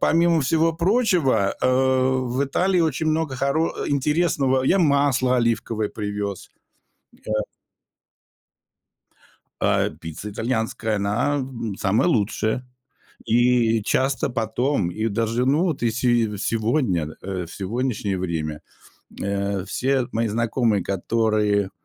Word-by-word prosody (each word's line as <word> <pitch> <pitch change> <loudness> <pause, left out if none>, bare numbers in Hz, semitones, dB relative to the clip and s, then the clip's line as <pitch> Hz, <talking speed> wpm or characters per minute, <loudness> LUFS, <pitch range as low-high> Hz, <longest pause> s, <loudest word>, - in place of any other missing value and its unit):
помимо 170 0 +3
всего 160 +4 +2
прочего, 170 - +2
э, - - +2
в 130 0 +1
Италии 180 +6 +1
очень 160 -1 0
много 155 -3 0
хоро 140 +5 0 0.2
интересного. 140 -2 +1
Я 185 +9 +3
масло 140 -5 +3
оливковое 115 -2 0
привез, 105 -2 -5 0.8
э. - - -5 2.3
А, - - +2
пицца 80 +6 -8
итальянская, 110 0 -2
она, 105 +8 0
м, 120 -6 -4
самая 105 - +2
лучшая. 110 - 0 0.6
И 120 -2 +3
часто 135 +5 0
потом, 115 -2 -1
и 110 +5 -2
даже, 115 +3 0
ну, 150 +6 +3
вот 160 -9 -2
если 120 +2 0 0.3
и - - -5
сегодня, 110 - 0
э, 95 -2 -4
в - - -12
сегодняшнее 105 -1 -2
время, 80 -4 -3 0.6
э, 100 -1 -2
все 130 +1 0
мои 115 +1 0
знакомые, 115 -2 +1
которые 105 0 0
120 Hz, 115 wpm, -23 LUFS, 105-140 Hz, 2.3 s, помимо